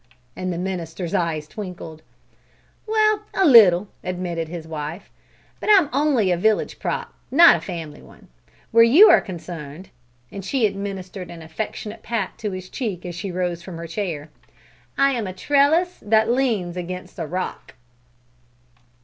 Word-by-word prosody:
And 185 0 -3
the 170 - -3
minister's 175 -2 -4
eye 165 -3 0
twinkled. 165 -2 -9 0.9
"Well, 430 -1 +2
a 385 - +3
little!" 210 - +7 0.2
admitted 175 -2 -3
his 165 -1 -7
wife; 160 +4 -6 0.5
"but - - -4
I'm 375 -8 +6
only 270 -9 +2
a 175 - +1
village 215 +4 0
prop, - - -3 0.2
not 335 +5 +7
a - - -9
family 165 -5 -7
one. - - -18 0.4
Where 230 0 +7
you 310 - +8
are - - +6
concerned" 170 -2 -8 0.4
and 195 - -7
she 240 +4 +1
administered 195 -2 -5
an 165 -1 -10
affectionate 210 +6 -6
pat 225 -5 -3
to 215 - -3
his 185 -1 -7
cheek 195 -6 -5
as 175 - -5
she 180 +3 -5
rose 175 -1 -2
from 170 -1 -9
her 170 - -6
chair 165 -4 -4 0.7
"I'm 265 -6 +2
a 185 - -5
trellis 290 - +2
that 220 +2 +2
leans 225 -9 0
against 180 +1 -7
a 165 - -3
rock!" 185 +4 -5
185 Hz, 150 wpm, -22 LUFS, 170-230 Hz, 0.9 s, you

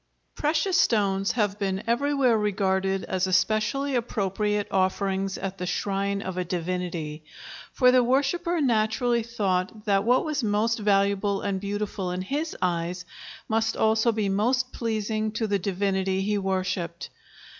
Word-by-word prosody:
] - - -47
Precious 320 +5 +2
stones 195 -3 +1
have 210 -3 0
been 195 -1 -1
everywhere 260 +1 +2
regarded 195 -2 0
as 190 0 -1
especially 215 +9 +1
appropriate 210 -3 -1
offerings 195 0 0
at 195 0 -5
the 180 - -3
shrine 200 +2 -1
of 185 -1 -5
a - - 0
divinity, 170 -3 -3 0.5
for 250 -1 +4
the 255 -1 +5
worshipper 285 +7 +1
naturally 235 -1 +2
thought 210 -2 -2
that 200 -2 +2
what 245 +7 +3
was 300 -4 -1
most 220 +2 +1
valuable 200 -1 +2
and 195 -2 -1
beautiful 205 -2 -3
in 180 +1 -3
his 295 - -3
eyes 175 0 -1 0.4
must 220 0 0
also 220 +1 +3
be 215 -2 -1
most 245 +6 +1
pleasing 215 -1 -2
to 220 +1 -2
the 200 -2 0
divinity 190 0 0
he 210 +2 0
worshipped. 185 -3 -2
205 Hz, 145 wpm, -26 LUFS, 190-230 Hz, 0.5 s, the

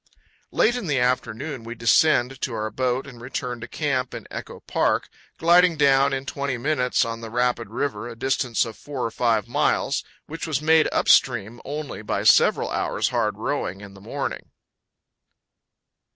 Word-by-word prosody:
Late 240 +3 +3
in 245 -7 -4
the 145 -3 +1
afternoon 125 +2 -1
we 115 +1 -7
descend 125 +2 +3
to 125 - -2
our 110 0 -3
boat 130 0 -1
and 125 -4 -12
return 125 -1 -5
to 115 - -6
camp 130 -2 -2
in - - -8
Echo - - -7
Park, - - 0 0.3
gliding 175 0 +5
down 140 -1 +4
in 135 0 -3
twenty 140 -2 -3
minutes 125 -1 +1
on 115 0 -5
the 115 - -7
rapid 120 -1 0
river, 120 -1 -3
a 115 - -8
distance 125 -1 0
of 115 -2 -8
four 140 -3 -5
or 115 - -2
five 115 -2 +1
miles, 145 +1 +1 0.2
which 165 +2 -6
was 150 -4 0
made 160 +1 +4
up - - 0
stream 120 -2 +3
only 145 -5 -5
by 105 - -2
several - - +4
hours' - - 0
hard - - 0
rowing 95 +3 -3
in 100 -1 -11
the 100 - -15
morning. - - -5
125 Hz, 170 wpm, -24 LUFS, 115-145 Hz, 0.3 s, gliding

